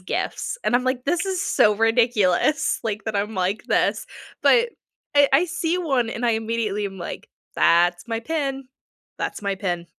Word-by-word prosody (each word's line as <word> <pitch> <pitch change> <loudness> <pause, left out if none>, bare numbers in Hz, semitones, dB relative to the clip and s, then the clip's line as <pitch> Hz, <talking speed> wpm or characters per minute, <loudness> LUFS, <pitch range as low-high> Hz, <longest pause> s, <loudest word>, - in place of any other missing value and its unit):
gifts 185 - -3
and - - +1
I'm 250 - -2
like 255 -1 -1
this 335 +6 0
is 380 -2 -1
so 210 - +3
ridiculous, 225 - +2
like, 215 -1 -3
that 220 -2 -2
I'm 210 +2 -2
like 190 +2 -1
this. - - 0 0.4
But 475 -1 +4 0.4
I 285 -1 +6
I 280 +6 +5
see 345 0 -1
one 270 -9 0
and 235 +1 -4
I - - +3
immediately 220 -2 -2
am 195 -1 -9
like, 175 - -7 0.3
"That's 175 +2 +3
my 230 -1 -3
pin. 275 -1 -3 0.5
That's - - -3
my 200 -1 -1
pin." 175 -3 -3
230 Hz, 175 wpm, -23 LUFS, 200-275 Hz, 0.5 s, I